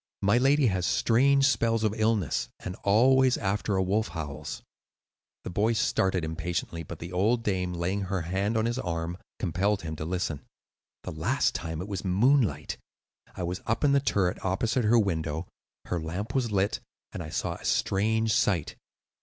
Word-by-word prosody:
My 100 +5 +4
lady 140 +2 +4
has 95 -5 +1
strange 135 +4 +3
spells 115 -4 +1
of 105 -1 +1
illness, 110 - 0
and 90 - -5
always 130 +5 +4
after 100 +1 -1
a 95 - +2
wolf 105 +4 +1
howls." 75 -1 -6 0.8
The - - -6
boy 105 +6 +2
started 95 -5 +1
impatiently, 85 +1 -3
but 80 - -8
the 85 +2 -8
old 110 +6 +1
dame, 90 -4 -1
laying 90 +4 -1
her 95 -1 -2
hand 95 +6 -1
on 110 - +1
his 120 +2 -1
arm, 85 -2 -3 0.2
compelled 100 +3 0
him 80 -1 -4
to - - -4
listen. 85 -4 -2 0.6
"The - - -5
last 115 - 0
time 80 -1 -4
it - - -8
was 100 -3 -4
moonlight. 100 - +2 0.6
I 90 - -4
was 90 +2 -3
up 110 - 0
in 145 - +4
the 140 - +5
turret 95 -9 0
opposite 110 +6 0
her 115 +3 +5
window; 80 -5 -1 0.4
her 90 - -2
lamp 90 +8 -4
was 130 -4 0
lit, 100 +1 +1 0.3
and - - -6
I - - -6
saw - - -2
a - - -15
strange 110 +3 +1
sight. 85 -7 +1
95 Hz, 175 wpm, -28 LUFS, 85-115 Hz, 0.8 s, the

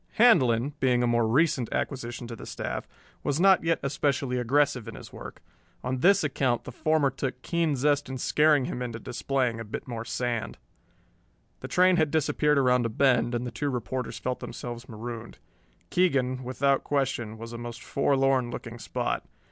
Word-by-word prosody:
Handlon, 145 - +4
being 125 -2 +2
a - - +3
more 120 -1 +2
recent 130 0 +2
acquisition 120 -3 -3
to 115 0 -7
the - - -10
staff, - - -4 0.3
was 145 +1 -1
not 190 0 +5
yet 165 0 +2
especially 135 -2 0
aggressive 125 -1 +1
in - - -7
his - - -11
work. - - -10 0.4
On 130 0 -2
this 195 +6 +5
account 135 -4 0
the - - -8
former 155 +1 +1
took 130 -1 -4
keen 165 -3 +1
zest 145 +2 +1
in 130 - -4
scaring 150 +1 +3
him 125 - -4
into 120 -2 -4
displaying 125 -1 -1
a - - -4
bit 105 +4 -7
more 115 -2 -4
sand. 120 0 -3 1.0
The - - -7
train 180 0 +4
had 155 -3 +3
disappeared 150 -1 +2
around 125 -3 +3
a - - -5
bend 120 0 +2
and 120 +1 -2
the 125 - -4
two 140 +5 -2
reporters 125 -1 -3
felt 125 0 -3
themselves 120 0 -7
marooned. 115 +1 -7 0.5
Keegan, 130 -8 +1
without 135 +2 +1
question, 130 -6 -1
was 115 +1 -8
a 115 - -6
most 120 0 -7
forlorn 135 -2 +2
looking 120 0 -7
spot. - - -2
130 Hz, 175 wpm, -27 LUFS, 120-145 Hz, 1.0 s, not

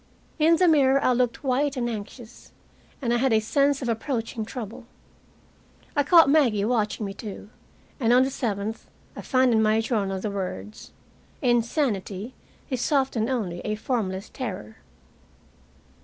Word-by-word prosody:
In 320 +2 +5
the 360 +2 +3
mirror 275 -4 +4
I - - +4
looked 245 +2 0
white 275 +1 0
and 240 -1 -1
anxious, 225 +1 -8 0.5
and 235 -1 +1
I - - +3
had 260 +1 +1
a 220 - +4
sense 275 +5 +1
of - - -3
approaching 230 -1 -2
trouble. 230 0 -8 1.1
I 290 - +4
caught 330 +2 +6
Maggie 255 -9 +3
watching 215 -2 0
me, 195 - -5
too, 205 0 -9 0.5
and 235 -3 +2
on 250 +1 +6
the 265 - -1
seventh 215 -3 -3 0.3
I - - -6
find 255 -2 +2
in 220 - +3
my 215 0 +3
journal 205 -4 -1
the 205 +2 -3
words: 200 +2 -6 0.5
"Insanity 235 - 0 0.4
is 255 +3 -1
often 265 -5 +1
only 200 -9 -2
a 215 +3 -3
formless 210 -4 -3
terror." 185 - -6
235 Hz, 150 wpm, -25 LUFS, 215-265 Hz, 1.1 s, caught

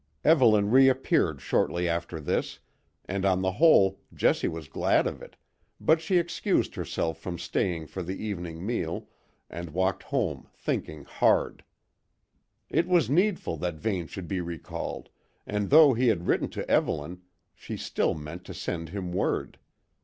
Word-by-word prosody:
Evelyn 110 -10 +5
reappeared 130 +1 +3
shortly 85 0 0
after 85 -1 -2
this, 75 - -2 0.5
and 95 0 -3
on 95 -1 +2
the 95 - +1
whole 100 - +5 0.2
Jessie - - +2
was 80 -2 -5
glad 70 - +2
of - - -4
it, - - -12 0.4
but 160 0 +3
she 180 +2 +1
excused 170 0 0
herself 80 -1 -3
from 85 +1 -5
staying 85 -1 -2
for 80 +5 -6
the 90 +2 -4
evening 90 -5 -5
meal, 90 -7 -2 0.4
and 85 0 -7
walked 95 +4 0
home - - -2
thinking 75 -2 -3
hard. - - +1 1.0
It 170 - +1
was 175 -7 +3
needful 180 - +1
that 85 +2 -3
Vane 90 -1 -2
should 90 0 -7
be 90 +2 -2
recalled, 85 -2 -6 0.4
and 105 -1 -2
though 150 -1 +8
he 125 +2 +1
had 95 -7 +1
written - - +1
to - - -6
Evelyn, 85 +5 0 0.3
she - - -7
still - - -1
meant 80 +4 -8
to 95 - -8
send 85 -2 -4
him 90 -1 -5
word. 95 - -1
95 Hz, 155 wpm, -27 LUFS, 85-115 Hz, 1.0 s, though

